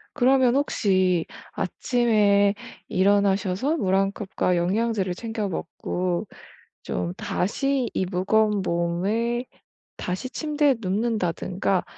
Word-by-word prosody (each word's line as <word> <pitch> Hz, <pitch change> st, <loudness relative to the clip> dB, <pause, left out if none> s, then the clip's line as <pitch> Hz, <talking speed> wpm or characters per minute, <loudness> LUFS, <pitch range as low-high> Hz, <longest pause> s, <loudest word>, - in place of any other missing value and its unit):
그러면 260 Hz, 0 st, +4 dB
혹시 185 Hz, -, +2 dB, 0.3 s
아침에 210 Hz, -5 st, +2 dB, 0.3 s
일어나셔서 200 Hz, -, +2 dB
물 190 Hz, -9 st, 0 dB
1 195 Hz, 0 st, +1 dB
컵과 190 Hz, -3 st, -1 dB
영양제를 195 Hz, +1 st, 0 dB
챙겨 220 Hz, +1 st, -4 dB
먹고 180 Hz, +3 st, -3 dB, 0.6 s
좀 90 Hz, 0 st, -3 dB
다시 265 Hz, +6 st, -1 dB
이 190 Hz, -, 0 dB
무거운 205 Hz, +3 st, +1 dB
몸을 195 Hz, +8 st, -1 dB, 0.5 s
다시 185 Hz, +8 st, -4 dB
침대에 295 Hz, -2 st, +1 dB
눕는다든가 190 Hz, -2 st, -1 dB
200 Hz, 215 characters per minute, -24 LUFS, 185-235 Hz, 0.6 s, 그러면